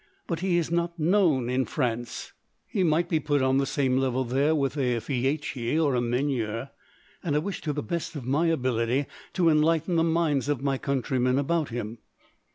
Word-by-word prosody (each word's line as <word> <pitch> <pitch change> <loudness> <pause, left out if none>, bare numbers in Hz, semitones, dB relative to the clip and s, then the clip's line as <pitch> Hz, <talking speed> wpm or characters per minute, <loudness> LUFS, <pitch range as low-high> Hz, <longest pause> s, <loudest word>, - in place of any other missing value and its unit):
But 165 -3 -3
he 180 -1 +1
is 165 -1 -1
not 170 0 0
known 165 -6 +3
in 130 +1 +1
France; 120 -4 -3 0.3
he 195 - -1
might 170 +1 +2
be 160 -2 +1
put 145 -2 +1
on 130 +1 +3
the 135 - 0
same 130 -3 +1
level 130 -1 +1
there 140 +6 +2
with 140 -2 0
a 125 -4 +1
Fieschi 135 0 -1
or 155 -4 +2
a 125 - +1
Meunier, 120 -1 -1 0.5
and 155 -5 0
I - - +4
wish, 185 +6 -3
to 150 - -2
the 145 0 -3
best 170 -2 -3
of 135 -5 -6
my 145 +6 +2
ability, 130 -3 +1 0.3
to 180 -3 +2
enlighten 165 +2 +3
the 165 - +4
minds 160 -4 +1
of 140 -3 -1
my 135 -2 0
countrymen 130 -1 0
about 155 +2 0
him." 115 -1 -5
140 Hz, 190 wpm, -27 LUFS, 130-165 Hz, 0.5 s, I